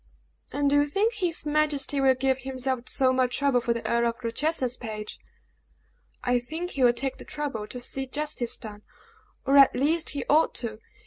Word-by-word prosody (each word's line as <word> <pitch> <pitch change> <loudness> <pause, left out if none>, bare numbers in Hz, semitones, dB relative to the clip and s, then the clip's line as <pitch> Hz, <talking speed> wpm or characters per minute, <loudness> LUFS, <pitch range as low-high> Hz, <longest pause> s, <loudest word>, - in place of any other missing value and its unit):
"And 285 0 0
do 285 +1 +4
you 290 0 +3
think 410 +10 +1
his 355 -7 0
majesty 295 -2 +1
will 265 -1 +4
give 265 0 +1
himself 260 -1 -3
so 260 -2 +3
much 255 -1 +1
trouble 280 -3 +2
for 235 - -1
the 235 0 -2
Earl 235 0 +2
of 230 - -5
Rochester's 255 +1 0
page?" 215 -3 -6 1.0
"I 245 0 +2
think 320 +9 -5
he 275 - -4
will 245 - +7
take 255 +3 -3
the - - -10
trouble 275 -8 -4
to 250 - -7
see 265 +2 -4
justice 290 -4 -2
done, 210 -3 -9 0.6
or 275 +1 +4
at 275 -1 +7
least 315 +5 +1
he 280 -3 -3
ought 310 +2 +3
to. 220 -3 -4
265 Hz, 190 wpm, -26 LUFS, 240-295 Hz, 1.0 s, will